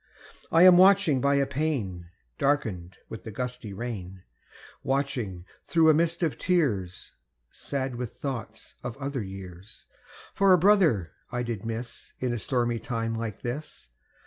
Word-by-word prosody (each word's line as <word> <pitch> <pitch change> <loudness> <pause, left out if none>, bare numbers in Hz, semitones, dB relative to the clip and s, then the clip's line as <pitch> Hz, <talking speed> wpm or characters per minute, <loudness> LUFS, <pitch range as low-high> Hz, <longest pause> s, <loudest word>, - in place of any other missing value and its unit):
I 165 +2 +6
am 180 -1 +9
watching 185 -8 +5
by 140 +1 +3
a 140 0 +3
pane 130 - -2 0.3
Darkened 100 -11 -1
with 110 - -8
the - - -7
gusty 125 -1 -5
rain, 95 -4 -6 0.6
Watching, 125 -10 -2 0.2
through 160 -2 +5
a - - +4
mist 170 +2 +1
of 160 - -1
tears, 120 - 0 0.4
Sad 135 -2 -3
with 120 -2 -5
thoughts 120 -5 -6
of 120 0 -5
other 140 -2 -3
years, 95 -1 -10 0.5
For 195 -1 +5
a - - +7
brother 170 - +3 0.2
I 120 0 -2
did 115 -3 -4
miss 115 +1 -6
In 125 -2 -1
a 120 - -2
stormy 120 0 0
time 115 -2 -3
like 115 -2 -5
this. 135 - -6
125 Hz, 145 wpm, -27 LUFS, 105-145 Hz, 0.6 s, am